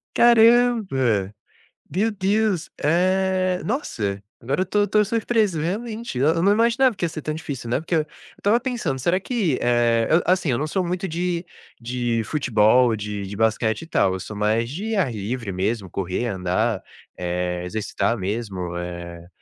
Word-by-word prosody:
Caramba. 225 - +4 0.6
Deu 210 +6 0
Deus. 200 -2 0
Eh, 185 +3 +2
nossa, 110 - -2 0.2
agora 135 +9 -1
eu - - +4
estou 205 +3 +1
estou 210 +1 +3
surpreso, 220 -5 +1
realmente, 215 - -3
e - - 0
eu 160 +4 +3
não 200 - +5
imaginava 235 +3 +3
que - - -6
ia 170 - +1
ser 155 - -6
tão 155 - -2
difícil, 145 -6 -6
né, 125 - +1
porque 165 +2 -2
eu - - +4
eu - - -7 0.3
estava 210 +4 +2
pensando: 230 - -2
"Será 170 +8 +1
que, 195 - 0
eh, 120 -1 +2
eu" 165 +2 +4
assim, 180 -3 +2
eu 120 - +1
não 150 - -2
sou 185 +4 -1
muito 180 +2 -2
de 175 +1 -2 0.4
de 120 -1 -1
futebol, 120 -3 +3
de 105 -1 -5
de 100 +1 -7
basquete 110 +2 +1
e 165 - -9
tal, 95 - +2
eu 95 - -3
sou 105 - -7
mais 110 +3 +1
de 210 - -3
ar 180 -11 +1
livre 110 +1 -4
mesmo, 95 +2 -2
correr, 95 +6 -2
andar, 95 -4 -1 0.4
eh, 90 0 -2
exercitar 105 +2 -1
mesmo, 95 -4 -4
eh, 85 -1 -7
140 Hz, 175 wpm, -23 LUFS, -, 0.6 s, não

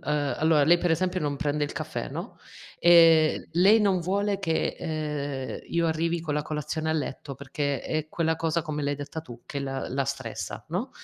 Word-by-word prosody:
ehm, 145 -1 0
allora, 155 -2 +4
lei 170 +3 +6
per 175 - 0
esempio 185 +3 +1
non 145 -2 -1
prende 150 -1 0
il - - -5
caffè, - - -4
no, - - -7 0.4
ehm, 165 -2 +6
lei 195 +6 +6
non 195 -3 +2
vuole 200 +3 0
che, 165 -5 -1
ehm, 150 -4 -3
io 170 0 +1
arrivi 165 +1 0
con 155 -3 -3
la 150 - 0
colazione 155 +1 -3
a - - +2
letto, 145 -2 -4
perché 140 -1 -3
è 155 0 -3
quella 160 -1 0
cosa 165 +1 0
come 150 -2 -4
l'hai 145 0 0
detta 145 +3 -6
tu, 120 -4 -11
che 140 - -4
la 135 -1 -3
la 135 +2 -1
stressa, 130 -4 -5
no. - - -3
155 Hz, 195 wpm, -27 LUFS, 145-170 Hz, 0.4 s, lei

